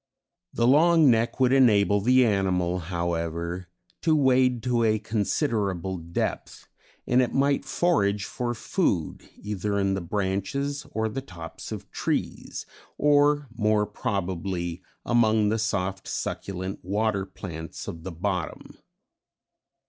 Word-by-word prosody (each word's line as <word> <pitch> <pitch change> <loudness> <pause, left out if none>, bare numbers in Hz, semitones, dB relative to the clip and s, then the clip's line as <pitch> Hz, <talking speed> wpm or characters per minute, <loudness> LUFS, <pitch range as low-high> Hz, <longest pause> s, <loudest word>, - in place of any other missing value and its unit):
The 115 - +1
long 155 +2 +6
neck 115 +2 +1
would 130 0 +4
enable 105 -6 +4
the 125 +3 +5
animal, 90 -4 +1
however, 85 0 -3 0.3
to 160 -2 +3
wade 130 -4 +3
to 120 -2 +1
a 110 -1 +3
considerable 105 - -1
depth, 85 +1 -4 0.4
and 125 +1 +3
it 125 - -1
might 140 +1 +2
forage 105 - +1
for 120 -1 -3
food 105 - -1
either 105 0 -3
in 100 -1 +1
the 95 - -2
branches 100 - -2
or 110 0 -1
the 135 +5 -4
tops 85 -10 -9
of - - -7
trees, - - -3 0.3
or 145 0 +3
more 105 -2 +2
probably, 95 -4 -3 0.2
among 110 -3 +3
the 110 +1 0
soft 95 -3 -2
succulent 95 0 -4
water 100 +1 0
plants 85 -4 -8
of 80 - -6
the 95 +3 -6
bottom. 90 0 -4
105 Hz, 125 wpm, -26 LUFS, 95-125 Hz, 0.4 s, long